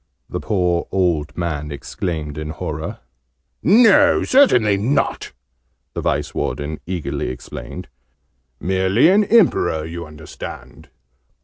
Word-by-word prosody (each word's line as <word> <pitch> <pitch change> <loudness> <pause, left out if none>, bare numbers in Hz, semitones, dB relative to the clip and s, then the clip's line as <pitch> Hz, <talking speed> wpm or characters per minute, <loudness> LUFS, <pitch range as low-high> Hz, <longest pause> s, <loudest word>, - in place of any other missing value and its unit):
the - - -4
poor 90 -5 0
old 80 -6 0
man 75 -4 -3
exclaimed 75 +1 -4
in 75 0 -5
horror. 75 - -5 0.6
"No! 245 - +5
Certainly 125 - +4
not!" 130 +8 -1 0.6
the - - -4
Vice - - -1
Warden 75 +4 -3
eagerly 90 -3 -3
explained. 65 - -8 0.7
"Merely 95 - +3
an 205 +3 +5
Emperor, 165 - +3
you 85 0 -7
understand." 75 0 -10
90 Hz, 105 wpm, -20 LUFS, 75-125 Hz, 0.7 s, No